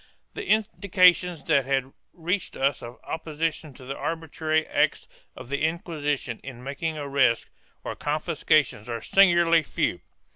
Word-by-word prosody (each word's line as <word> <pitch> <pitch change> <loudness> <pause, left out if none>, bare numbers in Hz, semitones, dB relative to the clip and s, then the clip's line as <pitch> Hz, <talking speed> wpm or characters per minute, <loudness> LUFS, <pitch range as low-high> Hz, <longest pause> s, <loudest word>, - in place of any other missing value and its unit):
The 430 - -6
indications 185 -6 +3
that 140 -5 +2
have 135 -1 -1 0.2
reached 175 +3 -3
us 135 0 0
of 120 +1 -9
opposition 160 -1 -3
to 130 - -13
the 135 +2 -5
arbitrary 160 -1 -1
acts - - 0 0.3
of - - -10
the 140 +1 -2
Inquisition 150 -6 -2
in 125 -2 -9
making 155 +4 -3
arrests 140 -5 +2 0.4
or - - -5
confiscations 150 -6 0
are 115 -1 -3
singularly 170 - +5
few. 155 - -2
155 Hz, 135 wpm, -25 LUFS, 135-170 Hz, 0.4 s, singularly